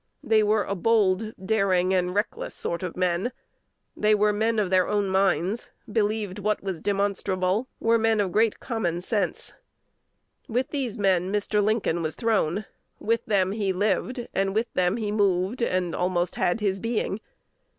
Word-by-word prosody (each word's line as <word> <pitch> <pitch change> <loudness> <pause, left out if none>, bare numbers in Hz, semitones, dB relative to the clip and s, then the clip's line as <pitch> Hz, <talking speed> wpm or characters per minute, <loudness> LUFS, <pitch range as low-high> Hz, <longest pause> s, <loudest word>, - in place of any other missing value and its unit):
They 220 -1 +4
were 210 0 +2
a - - -3
bold, 215 +1 +2
daring, 190 -2 +1
and 180 0 0
reckless 205 +2 -2
sort 170 - -3
of 180 -2 -5
men; 180 +6 0 0.6
they 215 0 +3
were 210 0 +3
men 220 +2 +1
of 200 -3 0
their 185 -1 +4
own 205 -2 0
minds, 190 +2 +1 0.2
believed 210 -2 -1
what 210 0 -1
was 190 -5 -4
demonstrable; 200 +1 0
were 230 0 +3
men 225 -1 +2
of 195 -3 0
great 220 +3 +2
common 175 -8 -2
sense. 200 -1 -2 0.9
With 250 +5 -1
these 260 -6 -2
men 190 -2 +2
Mr. 210 0 +1
Lincoln 205 -5 +1
was 155 -1 -2
thrown; 215 -4 0 0.3
with 230 +1 0
them 195 -3 +2
he 200 -2 -1
lived, 215 +6 -1
and 195 0 0
with 230 +2 -1
them 180 +3 +1
he 215 -3 -2
moved, 200 +2 +1
and 185 -6 0
almost 180 -1 0
had 175 +5 0
his 195 -2 0
being. 225 -2 -2
205 Hz, 160 wpm, -25 LUFS, 185-220 Hz, 0.9 s, They